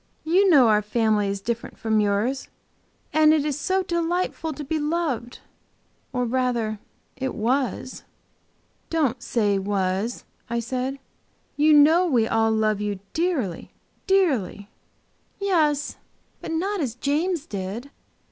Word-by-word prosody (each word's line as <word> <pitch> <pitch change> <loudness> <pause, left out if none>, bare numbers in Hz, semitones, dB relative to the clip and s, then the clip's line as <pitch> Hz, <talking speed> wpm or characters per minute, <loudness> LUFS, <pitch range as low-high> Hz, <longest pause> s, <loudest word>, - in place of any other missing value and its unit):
You 370 +5 +3
know 275 -8 +7
our 210 -1 +4
family 210 -1 +1
is 195 0 -3
different 230 +2 -4
from 220 -1 +1
yours. 210 +6 0 0.7
And 310 0 +5
it 300 -2 0
is 295 -1 -2
so 375 +6 0
delightful 340 -1 -1
to 295 0 -6
be 310 +3 -2
loved. 295 -6 -2 0.7
Or 250 -1 -1
rather 235 -3 -1 0.4
it 265 0 -3
was!" 255 +2 -1 0.9
"Don't 275 -7 0
say 205 -6 +1
was," 195 +3 -2 0.2
I 235 0 -1
said. 255 +3 -3 0.6
"You 305 +1 +4
know 315 +5 +6
we 240 -8 +2
all 225 0 +2
love 215 -2 +1
you 205 -1 -2 0.2
dearly, 310 - -1 0.4
dearly" 265 - +1 0.7
"Yes, 310 -7 +1 0.4
but - - -6
not 375 +4 -1
as 245 -6 -2
James 310 +5 -1
did!" 205 +6 -6
260 Hz, 130 wpm, -24 LUFS, 220-315 Hz, 0.9 s, know